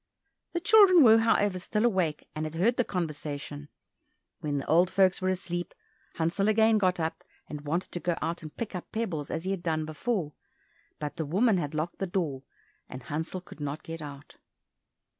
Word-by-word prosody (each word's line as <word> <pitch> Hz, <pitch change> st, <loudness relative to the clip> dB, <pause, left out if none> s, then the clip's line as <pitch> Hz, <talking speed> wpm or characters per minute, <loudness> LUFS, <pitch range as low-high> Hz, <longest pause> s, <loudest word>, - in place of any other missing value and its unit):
The 345 Hz, -, 0 dB
children 370 Hz, -3 st, +7 dB
were, 225 Hz, -2 st, +8 dB
however, 205 Hz, -4 st, +2 dB
still 210 Hz, +5 st, 0 dB
awake 185 Hz, -9 st, 0 dB
and 155 Hz, -, -3 dB
had 155 Hz, -, -8 dB
heard 225 Hz, +9 st, +2 dB
the 245 Hz, -, +3 dB
conversation. 150 Hz, -5 st, -4 dB, 0.7 s
When 145 Hz, -2 st, -2 dB
the 135 Hz, -, -3 dB
old 175 Hz, +3 st, +4 dB
folks 190 Hz, -1 st, +3 dB
were 185 Hz, -, +1 dB
asleep, 175 Hz, -2 st, -3 dB, 0.4 s
Hansel 170 Hz, +5 st, +1 dB
again 220 Hz, 0 st, +4 dB
got 185 Hz, -2 st, +2 dB
up, 160 Hz, 0 st, -3 dB, 0.2 s
and 150 Hz, -1 st, -6 dB
wanted 170 Hz, +5 st, -1 dB
to 175 Hz, -, -4 dB
go 175 Hz, -1 st, -1 dB
out 170 Hz, +1 st, -3 dB
and 155 Hz, -2 st, -10 dB
pick 230 Hz, -, -4 dB
up 180 Hz, -, -7 dB
pebbles 180 Hz, -10 st, -3 dB
as 160 Hz, -, -3 dB
he 190 Hz, -, -1 dB
had 195 Hz, -3 st, -2 dB
done 160 Hz, -3 st, -1 dB
before, 155 Hz, 0 st, -2 dB, 0.6 s
but 145 Hz, -1 st, -5 dB
the 160 Hz, -, -2 dB
woman 200 Hz, +6 st, +3 dB
had 150 Hz, -1 st, -4 dB
locked 155 Hz, +3 st, -3 dB
the 195 Hz, -, -1 dB
door, 165 Hz, -8 st, -2 dB, 0.5 s
and 130 Hz, 0 st, -8 dB
Hansel 160 Hz, +7 st, -4 dB
could 175 Hz, -, -14 dB
not 145 Hz, +1 st, -4 dB
get 165 Hz, -1 st, -7 dB
out. 145 Hz, -1 st, -10 dB
175 Hz, 190 wpm, -28 LUFS, 155-200 Hz, 0.7 s, were